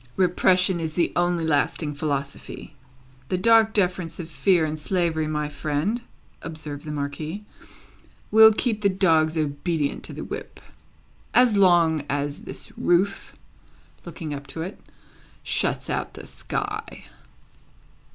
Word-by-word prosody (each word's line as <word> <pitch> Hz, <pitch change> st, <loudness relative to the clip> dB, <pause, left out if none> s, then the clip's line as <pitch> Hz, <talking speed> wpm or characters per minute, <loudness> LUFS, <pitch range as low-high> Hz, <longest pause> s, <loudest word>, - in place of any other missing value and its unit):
"Repression 185 Hz, 0 st, +3 dB
is 160 Hz, -1 st, -4 dB
the 175 Hz, -, +1 dB
only 175 Hz, -1 st, +1 dB
lasting 150 Hz, 0 st, 0 dB
philosophy. 140 Hz, -1 st, -4 dB, 0.6 s
The 185 Hz, -, +1 dB
dark 225 Hz, +2 st, +5 dB
deference 180 Hz, -5 st, 0 dB
of 165 Hz, -1 st, -7 dB
fear 175 Hz, -1 st, +3 dB
and 155 Hz, 0 st, -4 dB
slavery, 165 Hz, -2 st, 0 dB
my 150 Hz, -1 st, -1 dB
friend," 150 Hz, +10 st, -2 dB, 0.4 s
observed 155 Hz, -2 st, -7 dB
the 150 Hz, -, -5 dB
Marquis, 150 Hz, +7 st, -4 dB, 0.9 s
"will 220 Hz, +1 st, +9 dB
keep 215 Hz, 0 st, -1 dB
the 200 Hz, -, +3 dB
dogs 165 Hz, -4 st, +3 dB
obedient 150 Hz, 0 st, -1 dB
to -, -, -7 dB
the -, -, -6 dB
whip, -, -, -7 dB, 0.8 s
as 245 Hz, -3 st, +5 dB
long 170 Hz, -6 st, +4 dB
as 145 Hz, +1 st, -2 dB
this -, -, -10 dB
roof," 190 Hz, +3 st, +1 dB, 0.7 s
looking 165 Hz, -3 st, -6 dB
up 140 Hz, 0 st, -7 dB
to 160 Hz, +4 st, -5 dB
it, 185 Hz, +4 st, -7 dB, 0.6 s
"shuts -, -, 0 dB
out -, -, -3 dB
the -, -, -9 dB
sky." -, -, -5 dB
165 Hz, 130 wpm, -24 LUFS, 150-185 Hz, 0.9 s, will